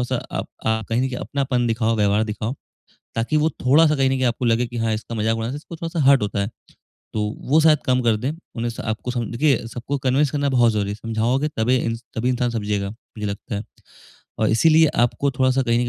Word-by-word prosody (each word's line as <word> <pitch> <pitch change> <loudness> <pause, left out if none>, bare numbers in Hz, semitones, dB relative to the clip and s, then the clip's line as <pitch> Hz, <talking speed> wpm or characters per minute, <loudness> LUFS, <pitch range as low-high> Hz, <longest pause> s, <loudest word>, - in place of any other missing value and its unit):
है 125 - +1
थोड़ा-सा 130 0 -1 0.2
अप - - -4 0.2
आप 110 -1 0
कहीं 125 +3 0
अपनापन 130 -3 -1
दिखाओ 115 0 +1
व्यवहार 105 +1 +2
दिखाओ 110 +3 -3 0.6
ताकि 115 +7 +1
वो 155 +2 +3 0.2
थोड़ा-सा 150 +3 +5
कहीं 135 -1 +2
न 135 - +1
की 130 - -1
आपको 120 0 0
लगे 115 +1 +2
की 120 - -7
हाँ 115 -1 0
इसका 110 +2 -5
मज़ाक 110 +1 0
उड़ाना 115 +5 -3
इसको 155 +3 -9
थोड़ा-सा 165 0 -4
हर्ट 135 -4 +6
होता 100 0 -2
है। 100 - -2 0.7
तो 105 - 0 0.3
वो 155 +3 +6
शायद 155 -2 +5
कम 130 0 +3
कर 115 -2 +3
दें। 125 +6 -2 0.3
उन्हें 120 +1 -1
स 115 - -8
आपको 110 +3 -3
देखिए 120 0 +1
सबको 125 +5 -4
कन्विंस 135 +2 +2
करना 145 -1 0
बहुत 120 -3 +4
ज़रूरी 105 -2 -1
है। - - -3
समझाओगे 115 +6 0
तबे 120 +3 +2
इन 115 -1 -1 0.2
तभी 120 +3 0
इंसान 125 -1 0
समझेगा 105 -3 -2
मुझे 110 -1 -8
लगता 100 +2 -5
है। 100 - -2 0.8
और 110 - +2
इसीलिए 160 +7 +5 0.2
आपको 140 +3 0
थोड़ा-सा 130 +1 +2
कहीं 120 -1 +2
न - - +1
120 Hz, 220 wpm, -22 LUFS, 110-135 Hz, 0.8 s, हर्ट